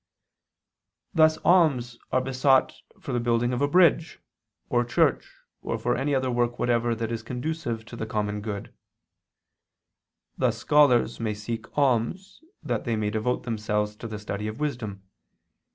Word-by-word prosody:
Thus 155 -1 +5
alms 140 -10 +3
are 130 - +2
besought 130 +1 +2 0.3
for 135 - -6
the 120 - +1
building 120 +1 +1
of 125 - -2
a 145 - +3
bridge, 170 0 +3 0.5
or 120 0 +2
church, 120 - +1 0.3
or - - -3
for - - 0
any 140 +2 0
other 130 -1 0
work 120 0 0
whatever 120 -1 +1
that 115 0 -3
is 115 -1 -3
conducive 125 -1 -4
to 120 - -10
the 110 -1 -5
common 105 -1 -2
good: 100 -2 -6 1.7
thus 120 -3 +1
scholars 125 -3 +3
may 110 -2 -2
seek 110 +2 -5
alms 140 - 0 0.2
that - - -2
they 115 -2 -1
may 105 -1 -1
devote 110 +3 -1
themselves 105 -2 -2
to 115 - -7
the 110 -1 -6
study 105 0 -4
of 110 +4 -6
wisdom. 115 -10 -4
120 Hz, 150 wpm, -26 LUFS, 110-135 Hz, 1.7 s, Thus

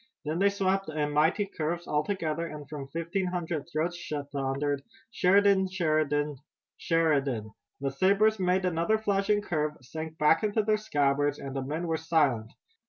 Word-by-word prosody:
Then 155 +3 -1
they 200 +1 +5
swept 195 -2 0
in 150 -1 -1
mighty 160 +8 +2
curves, 170 -2 -3
all 150 0 0
together, 165 -3 -2
and 150 -3 -8
from 140 -2 -7
fifteen 170 +6 -2
hundred 170 -3 -3
throats 175 +2 -3 0.2
thundered: 140 0 -1 0.3
"Sheridan! 195 0 +4
Sheridan! 155 -5 0 0.4
Sheridan!" 140 - +1 0.3
The 135 -1 -1
sabers 200 +8 +3
made 185 0 +2
another 175 +5 +1
flashing 205 -1 +1
curve, 155 -5 -1
sank 155 +5 -7
back 150 +5 +4
into 215 +1 +1
their 215 0 +2
scabbards, 145 -7 +1
and 135 -1 -7
the 135 - -1
men 155 +6 -3
were 165 -1 0
silent. 145 -9 +1
160 Hz, 155 wpm, -28 LUFS, 145-190 Hz, 0.4 s, they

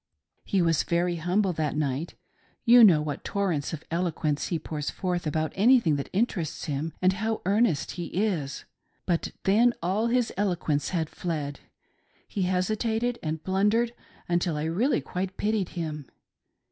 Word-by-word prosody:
He 190 -3 +2
was 165 -3 +3
very 175 0 0
humble 180 +3 +1
that 155 -2 -1
night. 145 +2 -2 0.5
You 240 0 +8
know 165 -8 +7
what 145 -2 -4
torrents 180 -8 -1
of 160 -2 -6
eloquence 160 -4 -1
he 170 - -1
pours 150 -2 -4
forth 180 -3 -2
about 155 +1 -1
anything 220 - +4
that 140 - -5
interests 190 -6 -1
him, 150 +2 -3
and 185 +1 +5
how 220 +3 -2
earnest 200 -5 +2
he 175 -1 -5
is. 175 -8 -2 0.4
But 170 -3 0
then 230 +5 +4
all 195 +7 0
his 245 -1 +1
eloquence 175 -7 0
had 165 -4 -1
fled. 150 -4 -4 0.7
He 200 - -3
hesitated 220 +6 0
and 155 -1 -3
blundered 210 +6 +2 0.3
until 175 -2 0
I 150 - -2
really 195 - +1
quite 185 +1 -4
pitied 210 -3 0
him. 150 -4 -4
175 Hz, 150 wpm, -27 LUFS, 155-205 Hz, 0.7 s, You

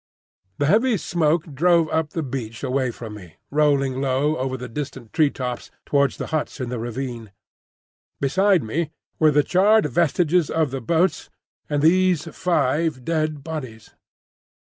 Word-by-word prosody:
The 145 - +1
heavy 220 - +3
smoke 165 -2 0
drove 170 +3 +3
up 160 -1 0
the 165 +1 -3
beach 120 -4 -5
away 130 -1 0
from 115 -2 -8
me, 90 -7 -12 0.2
rolling 140 -3 +2
low 140 +3 +1
over 130 -1 -2
the 125 0 -7
distant 130 -2 -7
tree 155 -3 +4
tops 125 -3 -5 0.2
towards 140 -2 +1
the - - -4
huts 155 -1 -2
in 125 -2 -3
the 125 -1 -3
ravine. 120 -2 -5 0.9
Beside 185 +5 +3
me 150 +8 -2 0.3
were 155 - +5
the 150 0 +3
charred 205 +6 +4
vestiges 170 +3 +2
of 160 -4 0
the 135 -1 -4
boats 165 +7 0 0.4
and 145 -1 0
these 180 -1 +3
five 160 -5 0
dead 155 -3 -1
bodies. 130 -9 -7
145 Hz, 150 wpm, -22 LUFS, 130-165 Hz, 0.9 s, were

